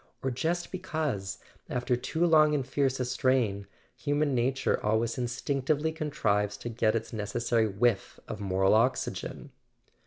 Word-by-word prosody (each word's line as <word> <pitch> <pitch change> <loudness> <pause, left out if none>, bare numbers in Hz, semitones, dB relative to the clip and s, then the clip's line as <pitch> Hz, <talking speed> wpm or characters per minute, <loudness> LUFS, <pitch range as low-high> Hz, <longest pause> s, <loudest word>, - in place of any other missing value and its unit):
or 130 - 0
just 170 +7 -1
be¬ 185 - -5
cause, 125 - -2 0.3
after 125 0 0
too 160 +7 0
long 155 -2 +5
and 135 -3 -1
fierce 135 -1 0
a 125 - 0
strain, 120 -6 +1 0.3
human 145 -1 0
nature 130 +2 +1
always 110 +2 +1
instinctively 140 +5 -1
contrives 105 -11 0
to 120 - -6
get 110 -1 +1
its 115 +1 -3
necessary 115 +1 0
whiff 105 +1 0
of 105 - -6
moral 95 0 +2
oxygen 115 +4 0
125 Hz, 145 wpm, -29 LUFS, 110-145 Hz, 0.3 s, long